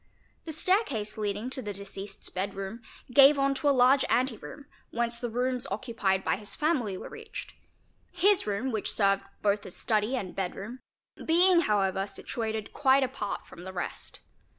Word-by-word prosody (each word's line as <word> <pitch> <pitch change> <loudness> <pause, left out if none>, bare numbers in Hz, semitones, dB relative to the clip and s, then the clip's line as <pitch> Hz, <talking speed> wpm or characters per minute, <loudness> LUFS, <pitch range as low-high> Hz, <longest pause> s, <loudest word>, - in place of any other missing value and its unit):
The 325 - -4
stair 370 +7 +3
case 215 - -4
leading 210 +3 -2
to 260 - -1
the 210 -3 -4
deceased's 200 0 -7
bed 195 +2 -3
room 195 +4 -5 0.3
gave 280 +2 +8
on 275 0 +2
toa 285 +2 +1
large 265 0 +5
ante 250 0 +2
room, 280 +6 -10 0.2
whence 235 0 -1
the 240 - -3
rooms 250 +2 -1
occupied 200 -4 0
by - - +1
his 205 0 -7
family 260 - 0
were - - -7
reached; - - -8 0.6
his 370 - +3
room 210 +6 -1
which 215 -3 -2
served 195 -1 +2 0.2
both 205 0 +2
as 180 - -9
study 220 +2 +1
and 195 -8 -4
bed 190 -2 -3
room, 225 +6 -7 0.4
being 350 +2 +5
however 195 - +1
situated 220 +1 -4
quite 270 -1 +4
apart 255 -6 -3
from 175 - -12
the 190 +1 -7
rest. 175 - -5
230 Hz, 175 wpm, -29 LUFS, 200-270 Hz, 0.6 s, gave